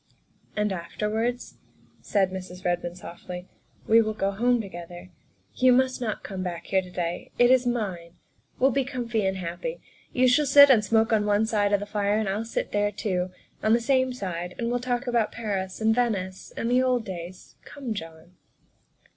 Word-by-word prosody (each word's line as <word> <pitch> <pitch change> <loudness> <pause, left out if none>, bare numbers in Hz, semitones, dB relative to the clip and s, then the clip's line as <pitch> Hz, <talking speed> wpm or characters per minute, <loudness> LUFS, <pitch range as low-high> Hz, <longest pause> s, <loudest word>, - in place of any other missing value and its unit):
"And 210 -1 0
afterwards," 215 +7 -3 0.4
said 195 -3 +1
Mrs. 185 -1 -8
Redmond 175 0 -1
softly, 180 0 -8 0.2
" - - -31
we 225 +1 +6
will 215 -1 -2
go 195 -2 0
home 240 +4 +2
together; 175 -2 -8 0.4
you 255 0 +4
must 255 0 +2
not 220 -3 -3
come 190 -2 -5
back 175 -2 -4
here 190 - +2
to 185 - -11
day 175 -1 -4
it 245 +1 +5
is 255 -1 +4
mine. 185 -8 -3 0.4
We'll 265 +2 +4
be 275 +1 +1
comfy 240 -5 -2
and 190 0 -1
happy. 185 - -5 0.3
You 255 0 +3
shall 280 +4 +4
sit 285 +1 +9
and 225 -5 +5
smoke 225 +2 +2
on 210 -1 +2
one 205 +1 +3
side 210 -3 +1
of 205 - +3
the 205 - -5
fire 205 0 0
and 220 -1 -1
I'll 205 +4 -1
sit 230 - -3
there 205 0 +1
too, 185 -3 -2 0.3
on 215 - +3
the 235 - +4
same 260 +2 +2
side, 180 -7 -5
and 235 0 -2
we'll 245 - 0
talk 245 +1 -2
about 235 -3 +1
Paris, 195 -5 -3
and 220 0 +3
Venice, 195 -6 -1
and 230 - -1
the 250 +1 +4
old 250 -3 +1
days. 180 -1 -8
Come, 265 -6 -6
John." 165 -1 -9
210 Hz, 190 wpm, -26 LUFS, 185-245 Hz, 0.4 s, sit